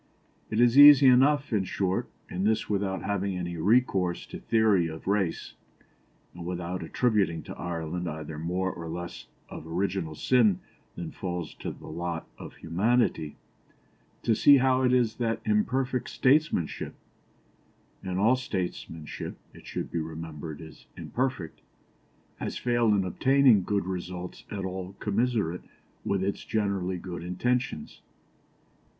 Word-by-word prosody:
It 110 Hz, -, -1 dB
is 120 Hz, +3 st, +5 dB
easy 145 Hz, -1 st, +10 dB
enough, 135 Hz, +2 st, +5 dB
in 100 Hz, -3 st, +2 dB
short, 95 Hz, 0 st, -1 dB, 0.2 s
and 90 Hz, +2 st, -3 dB
this 110 Hz, +1 st, +1 dB
without 100 Hz, -2 st, -1 dB
having 100 Hz, -2 st, -1 dB
any 85 Hz, -1 st, -4 dB
recourse 95 Hz, -2 st, +2 dB
to -, -, -8 dB
theory 110 Hz, -6 st, +3 dB
of 80 Hz, 0 st, -8 dB
race, 95 Hz, -3 st, -1 dB, 0.8 s
and 85 Hz, -, -9 dB
without 90 Hz, +1 st, -4 dB
attributing 100 Hz, -2 st, +1 dB
to -, -, -8 dB
Ireland 85 Hz, 0 st, -4 dB
either 75 Hz, -1 st, -6 dB
more 90 Hz, +3 st, -1 dB
or 85 Hz, -1 st, -7 dB
less 85 Hz, +1 st, -6 dB, 0.2 s
of 80 Hz, -, -9 dB
original 85 Hz, -2 st, -2 dB
sin 110 Hz, -, +3 dB, 0.4 s
than -, -, -6 dB
falls 90 Hz, -4 st, -5 dB
to -, -, -4 dB
the -, -, -10 dB
lot 85 Hz, -1 st, -4 dB
of -, -, -9 dB
humanity, 95 Hz, -2 st, 0 dB, 0.9 s
to 115 Hz, -, +3 dB
see 140 Hz, +6 st, +7 dB
how 130 Hz, 0 st, +3 dB
it 125 Hz, -1 st, +3 dB
is 120 Hz, -3 st, +2 dB
that 115 Hz, -2 st, -1 dB
imperfect 130 Hz, -, 0 dB
statesmanship 135 Hz, -, +1 dB, 1.1 s
and 95 Hz, -1 st, -3 dB
all 110 Hz, +6 st, +4 dB
statesmanship, 90 Hz, -9 st, -5 dB, 0.2 s
it -, -, -14 dB
should -, -, -4 dB
be 85 Hz, -, -1 dB
remembered, 80 Hz, -1 st, -6 dB
is 80 Hz, -1 st, -13 dB
imperfect 125 Hz, -11 st, -3 dB, 0.8 s
has -, -, -4 dB
failed 120 Hz, -3 st, +2 dB
in 95 Hz, -2 st, +1 dB
obtaining 130 Hz, +2 st, +4 dB
good 100 Hz, +1 st, -1 dB
results 90 Hz, -1 st, -6 dB
at 100 Hz, -3 st, -4 dB
all 95 Hz, 0 st, -5 dB
commensurate 105 Hz, -5 st, 0 dB, 0.4 s
with 100 Hz, -1 st, 0 dB
its 100 Hz, +1 st, -2 dB
generally 100 Hz, -4 st, -1 dB
good 85 Hz, -1 st, -7 dB
intentions. 90 Hz, 0 st, -2 dB
95 Hz, 135 wpm, -28 LUFS, 85-120 Hz, 1.1 s, easy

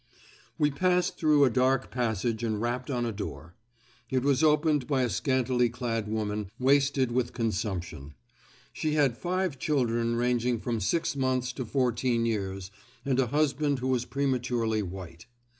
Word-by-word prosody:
We 150 Hz, -1 st, +2 dB
passed 180 Hz, +4 st, +1 dB
through 150 Hz, -3 st, +5 dB
a 130 Hz, -, +2 dB
dark 130 Hz, +1 st, +1 dB
passage 115 Hz, -1 st, -1 dB
and 110 Hz, -2 st, -1 dB
rapped 120 Hz, +3 st, -2 dB
on 120 Hz, -3 st, -1 dB
a 115 Hz, -, -1 dB
door. 85 Hz, -5 st, -7 dB, 0.6 s
It 130 Hz, -1 st, 0 dB
was 140 Hz, 0 st, +2 dB
opened 150 Hz, -3 st, +3 dB
by 135 Hz, -3 st, +1 dB
a 120 Hz, -, 0 dB
scantily 125 Hz, +3 st, +1 dB
clad 115 Hz, -3 st, -3 dB
woman, 105 Hz, -2 st, -2 dB
wasted 135 Hz, -1 st, +2 dB
with 120 Hz, 0 st, -1 dB
consumption. 95 Hz, -, -3 dB, 0.6 s
She 155 Hz, -1 st, -1 dB
had 140 Hz, -6 st, +2 dB
five 180 Hz, -2 st, -2 dB
children 120 Hz, -5 st, 0 dB
ranging 120 Hz, 0 st, +1 dB
from 115 Hz, 0 st, -2 dB
six 165 Hz, -, 0 dB
months 130 Hz, -2 st, 0 dB
to 130 Hz, -, -5 dB
fourteen 120 Hz, -1 st, +1 dB
years 95 Hz, -4 st, -3 dB, 0.3 s
and 135 Hz, -2 st, +1 dB
a 130 Hz, -, +2 dB
husband 145 Hz, +1 st, +1 dB
who 130 Hz, +1 st, -2 dB
was 125 Hz, -2 st, +1 dB
prematurely 125 Hz, -5 st, 0 dB
white. 90 Hz, -3 st, -8 dB
125 Hz, 155 wpm, -28 LUFS, 115-135 Hz, 0.6 s, through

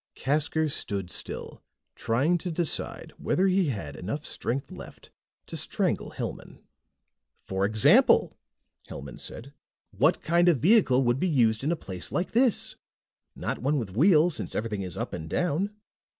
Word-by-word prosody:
Casker 155 Hz, +3 st, 0 dB
stood 100 Hz, -, -3 dB
still, -, -, -5 dB, 0.3 s
trying 140 Hz, +10 st, +1 dB
to 180 Hz, -, -4 dB
decide 170 Hz, -1 st, 0 dB
whether 185 Hz, -, +1 dB
he 190 Hz, -2 st, +2 dB
had 95 Hz, -, -4 dB
enough 140 Hz, -, -5 dB
strength 135 Hz, +3 st, -3 dB
left -, -, -12 dB, 0.3 s
to -, -, -8 dB
strangle -, -, -1 dB
Hellman. -, -, -7 dB, 0.8 s
"For 95 Hz, 0 st, -2 dB
example," 110 Hz, +1 st, +5 dB, 0.5 s
Hellman 70 Hz, -2 st, -8 dB
said, 135 Hz, +5 st, -8 dB, 0.4 s
"what 135 Hz, -, +2 dB
kind 175 Hz, +2 st, +3 dB
of 165 Hz, -, +3 dB
vehicle 155 Hz, -, +4 dB
would 120 Hz, +1 st, +1 dB
be 185 Hz, -, +1 dB
used 115 Hz, -6 st, +2 dB
in 150 Hz, -, 0 dB
a -, -, +1 dB
place 95 Hz, -, -6 dB
like 180 Hz, -, -2 dB
this? 240 Hz, -1 st, +2 dB, 0.6 s
Not -, -, -4 dB
one 145 Hz, +4 st, 0 dB
with 105 Hz, -7 st, -4 dB
wheels, 165 Hz, -, +4 dB
since -, -, -4 dB
everything 105 Hz, -2 st, -2 dB
is 90 Hz, -2 st, -6 dB
up -, -, -4 dB
and 80 Hz, 0 st, -6 dB
down. 180 Hz, -, 0 dB
140 Hz, 150 wpm, -27 LUFS, 110-170 Hz, 0.8 s, example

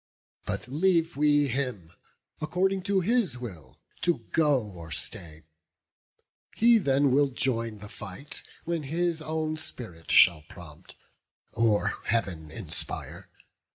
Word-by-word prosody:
But -, -, -2 dB
leave 165 Hz, +4 st, +2 dB
we 145 Hz, 0 st, +4 dB
him, 125 Hz, -10 st, -3 dB, 0.5 s
according 190 Hz, +5 st, +1 dB
to 195 Hz, -2 st, +3 dB
his 200 Hz, -, +1 dB
will, 90 Hz, -, -9 dB, 0.2 s
To 170 Hz, -10 st, 0 dB
go 150 Hz, -4 st, +4 dB
or 90 Hz, -6 st, -10 dB
stay: 80 Hz, +1 st, -7 dB, 1.1 s
he 235 Hz, 0 st, +6 dB
then 140 Hz, -5 st, +3 dB
will 140 Hz, +2 st, +4 dB
join 115 Hz, -4 st, -1 dB
the 105 Hz, +1 st, -10 dB
fight, 105 Hz, +7 st, -8 dB, 0.2 s
When 170 Hz, -1 st, -1 dB
his 165 Hz, +3 st, -1 dB
own 155 Hz, 0 st, -2 dB
spirit 90 Hz, -, -8 dB
shall 85 Hz, -4 st, +6 dB
prompt, 80 Hz, -4 st, -12 dB, 0.6 s
or 110 Hz, -3 st, +2 dB
Heav'n 90 Hz, -9 st, -1 dB
inspire. -, -, -6 dB
135 Hz, 120 wpm, -28 LUFS, 100-160 Hz, 1.1 s, he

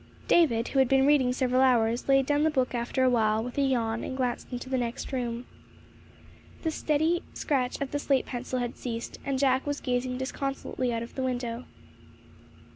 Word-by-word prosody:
David, 235 Hz, -9 st, +3 dB
who 270 Hz, -, +1 dB
had 265 Hz, -2 st, +4 dB
been 270 Hz, 0 st, +4 dB
reading 280 Hz, -3 st, +4 dB
several 255 Hz, 0 st, +1 dB
hours, 240 Hz, -1 st, +2 dB
laid 270 Hz, -1 st, +5 dB
down 290 Hz, +1 st, +2 dB
the 315 Hz, -, +4 dB
book 260 Hz, -4 st, 0 dB
after 240 Hz, +2 st, 0 dB
a 255 Hz, -, +5 dB
while, 220 Hz, -2 st, +2 dB
with 245 Hz, +1 st, -6 dB
a -, -, +4 dB
yawn, 235 Hz, -4 st, 0 dB
and 260 Hz, -, -4 dB
glanced 250 Hz, -2 st, -2 dB
into 245 Hz, +1 st, -5 dB
the 260 Hz, -1 st, 0 dB
next 240 Hz, +3 st, -4 dB
room. 240 Hz, -1 st, -2 dB, 1.2 s
The 320 Hz, -, 0 dB
steady 315 Hz, +3 st, +1 dB
scratch 255 Hz, -4 st, -1 dB
of 280 Hz, -1 st, -3 dB
the 290 Hz, -, -1 dB
slate 275 Hz, -2 st, +1 dB
pencil 255 Hz, +1 st, -4 dB
had 245 Hz, -1 st, -2 dB
ceased, 235 Hz, -2 st, -5 dB
and 275 Hz, -1 st, -1 dB
Jack 265 Hz, 0 st, +2 dB
was 290 Hz, 0 st, -1 dB
gazing 250 Hz, 0 st, -1 dB
disconsolately 260 Hz, -1 st, -3 dB
out 230 Hz, 0 st, -2 dB
of 235 Hz, -, -10 dB
the 265 Hz, -, -4 dB
window. 245 Hz, -2 st, -3 dB
255 Hz, 195 wpm, -28 LUFS, 240-275 Hz, 1.2 s, laid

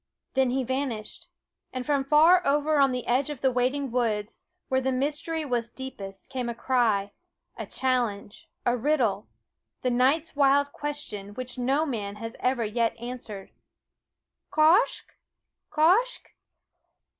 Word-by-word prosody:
Then 265 Hz, -1 st, +3 dB
he 260 Hz, +1 st, 0 dB
vanished; 255 Hz, -4 st, -4 dB, 0.4 s
and 255 Hz, -1 st, -4 dB
from 285 Hz, -2 st, +1 dB
far 315 Hz, +6 st, +6 dB
over 295 Hz, +1 st, +2 dB
on 275 Hz, -1 st, +5 dB
the 250 Hz, -1 st, -3 dB
edge 260 Hz, +4 st, +1 dB
of 295 Hz, -4 st, -6 dB
the 265 Hz, -, +3 dB
waiting 255 Hz, +2 st, 0 dB
woods, 220 Hz, -4 st, -1 dB, 0.3 s
where 260 Hz, 0 st, +1 dB
the 265 Hz, 0 st, 0 dB
mystery 300 Hz, +4 st, -2 dB
was 240 Hz, -4 st, -1 dB
deepest, 200 Hz, -8 st, -8 dB
came 255 Hz, -3 st, -3 dB
a 235 Hz, -, -4 dB
cry, 225 Hz, -6 st, +1 dB, 0.4 s
a -, -, -6 dB
challenge, 240 Hz, -5 st, -2 dB, 0.2 s
a 240 Hz, -, +3 dB
riddle, 240 Hz, -6 st, +1 dB, 0.6 s
the 250 Hz, -, +1 dB
night's 275 Hz, +7 st, +2 dB
wild 285 Hz, 0 st, +3 dB
question 215 Hz, -9 st, -6 dB
which 255 Hz, +1 st, -6 dB
no 270 Hz, +5 st, +1 dB
man 210 Hz, -8 st, -4 dB
has 225 Hz, +2 st, -7 dB
ever 250 Hz, -2 st, +1 dB
yet 230 Hz, +2 st, 0 dB
answered 235 Hz, -5 st, -7 dB, 1.0 s
Quoskh 325 Hz, +9 st, +4 dB
255 Hz, 135 wpm, -27 LUFS, 230-280 Hz, 1.0 s, far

